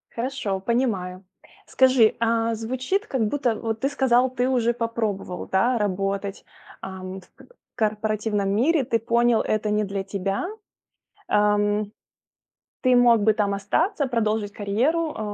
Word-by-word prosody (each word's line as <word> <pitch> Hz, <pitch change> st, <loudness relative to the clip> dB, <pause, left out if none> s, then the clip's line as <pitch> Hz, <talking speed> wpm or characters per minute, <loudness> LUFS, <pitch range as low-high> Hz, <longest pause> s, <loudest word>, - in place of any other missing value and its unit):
Хорошо, 235 Hz, -6 st, -2 dB
понимаю. 195 Hz, -5 st, -1 dB, 0.4 s
Скажи, 255 Hz, -4 st, +4 dB
а 230 Hz, 0 st, +1 dB
звучит 255 Hz, -, -2 dB
как 235 Hz, -5 st, 0 dB
будто 250 Hz, -3 st, 0 dB
Вот 225 Hz, -1 st, -4 dB
ты 275 Hz, -, +1 dB
сказал, 260 Hz, -2 st, +2 dB
ты 250 Hz, 0 st, -1 dB
уже 240 Hz, -2 st, +2 dB
попробовал, 225 Hz, -6 st, -3 dB
да, 235 Hz, +6 st, +2 dB
работать, 195 Hz, 0 st, -2 dB, 0.4 s
ам, 190 Hz, 0 st, -7 dB
в -, -, -21 dB
к -, -, -19 dB, 0.3 s
корпоративном 215 Hz, -1 st, 0 dB
мире, 265 Hz, +8 st, +2 dB
ты 235 Hz, -1 st, 0 dB
понял: 235 Hz, +1 st, +2 dB
это 215 Hz, 0 st, -1 dB
не 210 Hz, 0 st, +1 dB
для 195 Hz, -1 st, -3 dB
тебя, 195 Hz, -, -3 dB, 0.8 s
эм. 210 Hz, 0 st, +1 dB, 0.9 s
Ты 255 Hz, -1 st, +4 dB
мог 235 Hz, -3 st, +5 dB
бы 220 Hz, +1 st, +4 dB
там 205 Hz, -2 st, 0 dB
остаться, 285 Hz, -, 0 dB
продолжить 215 Hz, -4 st, -1 dB
карьеру, 270 Hz, +11 st, 0 dB
э, -, -, -6 dB
220 Hz, 135 wpm, -24 LUFS, 205-245 Hz, 0.9 s, мог